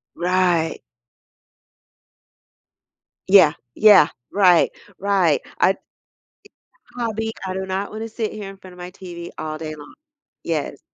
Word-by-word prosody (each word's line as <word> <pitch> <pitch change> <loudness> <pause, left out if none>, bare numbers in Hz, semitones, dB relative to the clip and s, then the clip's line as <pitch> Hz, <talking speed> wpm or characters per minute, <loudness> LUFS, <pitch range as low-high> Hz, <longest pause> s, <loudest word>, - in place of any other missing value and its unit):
Right. 175 -2 +1 2.5
Yeah, 185 -6 +7 0.2
yeah, 205 -7 +7 0.2
right, 185 -4 +5 0.3
right 190 -6 +2 0.2
I - - +5
It's 195 - -3 0.9
a - - -16
hobby, 220 -1 -2
I 185 - -3
do 190 0 -3
not 190 +1 -3
wanna 220 +1 -5
sit 225 -1 -4
here 205 -2 -7
in 195 - -12
front 185 -1 -14
of - - -16
my 180 0 -8
TV 175 -2 -9
all 155 0 -4
day 155 -1 -6
long. 145 -1 -13 0.5
Yes. - - -3
185 Hz, 130 wpm, -21 LUFS, 170-205 Hz, 2.5 s, Yeah